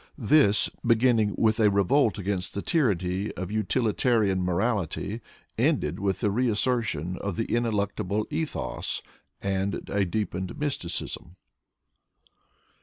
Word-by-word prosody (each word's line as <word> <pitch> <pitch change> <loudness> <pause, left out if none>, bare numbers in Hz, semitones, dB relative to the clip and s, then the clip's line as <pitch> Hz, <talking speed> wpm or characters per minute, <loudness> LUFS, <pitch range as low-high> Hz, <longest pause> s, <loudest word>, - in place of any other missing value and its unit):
This, 120 -4 +4 0.2
beginning 115 -3 +3
with 110 0 +2
a 105 -2 +5
revolt 105 +5 +3
against 95 -2 -3
the 100 - -3
tyranny 100 - 0
of 95 +1 -5
utilitarian 110 -1 +1
morality, 100 +3 -1 0.4
ended 75 +5 +1
with 95 -2 -1
the 105 - +2
reassertion 110 - 0
of 100 -3 -3
the 115 - -1
ineluctable 105 -3 0
ethos 155 0 -3 0.4
and 100 0 -1
a 100 0 +2
deepened 95 - -3
mysticism. 110 - -3
105 Hz, 110 wpm, -27 LUFS, 95-115 Hz, 0.4 s, a